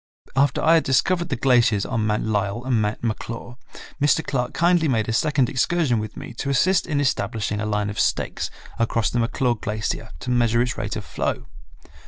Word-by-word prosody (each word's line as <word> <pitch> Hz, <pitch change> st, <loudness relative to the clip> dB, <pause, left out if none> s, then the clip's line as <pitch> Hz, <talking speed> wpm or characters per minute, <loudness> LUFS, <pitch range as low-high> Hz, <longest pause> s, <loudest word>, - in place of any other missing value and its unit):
After 140 Hz, +2 st, +2 dB
I 165 Hz, -, +5 dB
had 165 Hz, -, +4 dB
discovered 170 Hz, +6 st, +1 dB
the 135 Hz, -, 0 dB
glaciers 120 Hz, -5 st, +3 dB
on 115 Hz, -4 st, -1 dB
Mount 105 Hz, 0 st, 0 dB
Lyell 110 Hz, +2 st, -1 dB
and 125 Hz, -4 st, +2 dB
Mount 105 Hz, +2 st, -2 dB
McClure, 115 Hz, +2 st, -4 dB, 0.4 s
Mr. 150 Hz, +2 st, +3 dB
Clark 125 Hz, -3 st, -1 dB
kindly 170 Hz, -1 st, +3 dB
made 115 Hz, -6 st, +1 dB
a 115 Hz, -, -1 dB
second 135 Hz, +1 st, +2 dB
excursion 135 Hz, -2 st, +1 dB
with 110 Hz, 0 st, -6 dB
me -, -, -8 dB
to 140 Hz, -, -2 dB
assist 180 Hz, +7 st, +2 dB
in 150 Hz, -3 st, 0 dB
establishing 110 Hz, -5 st, -1 dB
a 110 Hz, -, -2 dB
line 105 Hz, -1 st, -1 dB
of 105 Hz, -, -6 dB
stakes -, -, 0 dB, 0.3 s
across 115 Hz, -1 st, +1 dB
the 120 Hz, -, 0 dB
McClure 120 Hz, +2 st, +1 dB
glacier 110 Hz, 0 st, -3 dB
to 125 Hz, -, -3 dB
measure 120 Hz, -1 st, +2 dB
its 125 Hz, +1 st, -3 dB
rate 110 Hz, -2 st, -4 dB
of 105 Hz, -, -5 dB
flow. -, -, -3 dB
120 Hz, 195 wpm, -23 LUFS, 110-135 Hz, 0.4 s, I